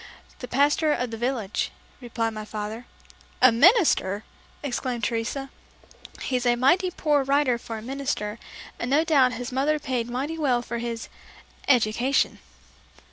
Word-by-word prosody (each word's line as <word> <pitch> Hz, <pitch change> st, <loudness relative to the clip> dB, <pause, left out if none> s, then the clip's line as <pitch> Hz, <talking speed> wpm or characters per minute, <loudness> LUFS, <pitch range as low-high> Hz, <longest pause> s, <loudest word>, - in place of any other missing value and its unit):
"The 250 Hz, -, -6 dB
Pastor 290 Hz, +5 st, +2 dB
of 250 Hz, -4 st, -2 dB
the -, -, -4 dB
village," 235 Hz, -4 st, -1 dB, 0.3 s
replied 230 Hz, -2 st, -2 dB
my 215 Hz, -1 st, -6 dB
father. 215 Hz, +2 st, -6 dB, 0.5 s
"A 255 Hz, -1 st, +7 dB
minister!" 235 Hz, -, +4 dB, 0.4 s
exclaimed 250 Hz, -3 st, -3 dB
Teresa. 240 Hz, +5 st, -2 dB, 0.7 s
"He's 250 Hz, -2 st, -1 dB
a 240 Hz, -, +4 dB
mighty 345 Hz, +10 st, +3 dB
poor 300 Hz, -5 st, +1 dB
writer 275 Hz, -3 st, +2 dB
for 225 Hz, -1 st, -6 dB
a 215 Hz, -, -8 dB
minister, 240 Hz, -5 st, -3 dB, 0.4 s
and 235 Hz, -, -3 dB
no 290 Hz, +4 st, +4 dB
doubt 275 Hz, -6 st, +4 dB
his 245 Hz, 0 st, -5 dB
mother 280 Hz, +4 st, +1 dB
paid 250 Hz, -5 st, -3 dB
mighty 280 Hz, +7 st, -3 dB
well 250 Hz, -5 st, +1 dB
for 235 Hz, 0 st, -4 dB
his 230 Hz, -1 st, -4 dB, 0.6 s
'education.'" 245 Hz, +1 st, +2 dB
250 Hz, 140 wpm, -25 LUFS, 230-280 Hz, 0.7 s, A